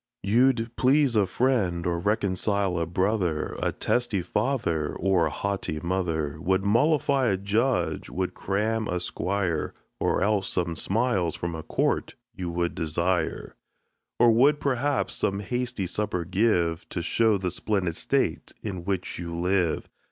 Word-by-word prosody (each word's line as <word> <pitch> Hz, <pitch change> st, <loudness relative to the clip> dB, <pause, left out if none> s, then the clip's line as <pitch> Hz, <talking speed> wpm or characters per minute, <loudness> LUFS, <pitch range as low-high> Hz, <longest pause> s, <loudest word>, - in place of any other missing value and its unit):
You'd 115 Hz, +2 st, +2 dB
please 135 Hz, -1 st, +3 dB
a 100 Hz, -3 st, +3 dB
friend, 95 Hz, -5 st, +1 dB
or 85 Hz, -1 st, 0 dB
reconcile 100 Hz, -1 st, 0 dB
a 85 Hz, -, -1 dB
brother, 90 Hz, -2 st, 0 dB
A -, -, +1 dB
testy 120 Hz, -7 st, 0 dB
father, 85 Hz, -, -1 dB
or 95 Hz, -4 st, +2 dB
a -, -, -2 dB
haughty 95 Hz, 0 st, -3 dB
mother; 80 Hz, -4 st, -2 dB
Would 95 Hz, +2 st, +1 dB
mollify 135 Hz, +4 st, +3 dB
a 95 Hz, -3 st, +2 dB
judge, 110 Hz, +6 st, 0 dB
would 95 Hz, 0 st, -2 dB
cram 110 Hz, +3 st, -1 dB
a 90 Hz, 0 st, -1 dB
squire, 90 Hz, -2 st, -2 dB, 0.2 s
Or -, -, +1 dB
else 100 Hz, -1 st, +1 dB
some 85 Hz, -2 st, -1 dB
smiles 95 Hz, -4 st, 0 dB
from 85 Hz, 0 st, -4 dB
court -, -, -1 dB, 0.2 s
you 90 Hz, -5 st, -4 dB
would 85 Hz, 0 st, -1 dB
desire; 85 Hz, +3 st, -1 dB, 0.6 s
Or 120 Hz, -1 st, +6 dB
would, 140 Hz, +6 st, +4 dB
perhaps, 140 Hz, +1 st, 0 dB
some 100 Hz, 0 st, 0 dB
hasty 120 Hz, -1 st, -2 dB
supper 90 Hz, -2 st, -2 dB
give, 90 Hz, -4 st, +1 dB
To 85 Hz, -, -3 dB
show 110 Hz, +2 st, +3 dB
the 90 Hz, -2 st, -2 dB
splendid 95 Hz, -3 st, -1 dB
state -, -, -1 dB
in 95 Hz, -5 st, -4 dB
which 95 Hz, -3 st, -2 dB
you 85 Hz, -1 st, -5 dB
live. 90 Hz, -2 st, +1 dB
95 Hz, 145 wpm, -26 LUFS, 85-115 Hz, 0.6 s, Or